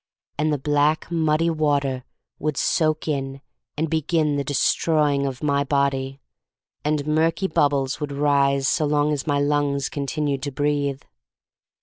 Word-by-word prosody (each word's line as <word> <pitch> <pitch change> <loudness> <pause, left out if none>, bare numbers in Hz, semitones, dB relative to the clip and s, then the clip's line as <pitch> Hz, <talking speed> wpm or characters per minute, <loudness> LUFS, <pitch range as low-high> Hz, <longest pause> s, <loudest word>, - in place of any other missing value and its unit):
And 155 +1 +1
the 150 - +1
black, 145 +4 +1
muddy 165 0 +2
water 140 -5 0 0.3
would 150 -3 -2
soak 155 -1 +1
in 135 -2 -2 0.4
and 160 +2 0
begin 160 -1 0
the 140 - -1
de 145 +1 -3
stroying 145 -3 +2
of 130 +1 -6
my 140 -1 +2
body, 135 -1 -1 0.6
and 150 -1 0
murky 160 +5 +1
bub 145 -5 +3
bles 135 -1 -2
would 150 -2 -4
rise 140 -1 +2
so 150 - +1
long 150 0 +2
as 145 0 -4
my 145 -1 +1
lungs 145 -1 0
continued 145 -1 -2
to 145 0 -3
breathe. 145 0 -1
145 Hz, 150 wpm, -23 LUFS, 140-150 Hz, 0.6 s, bub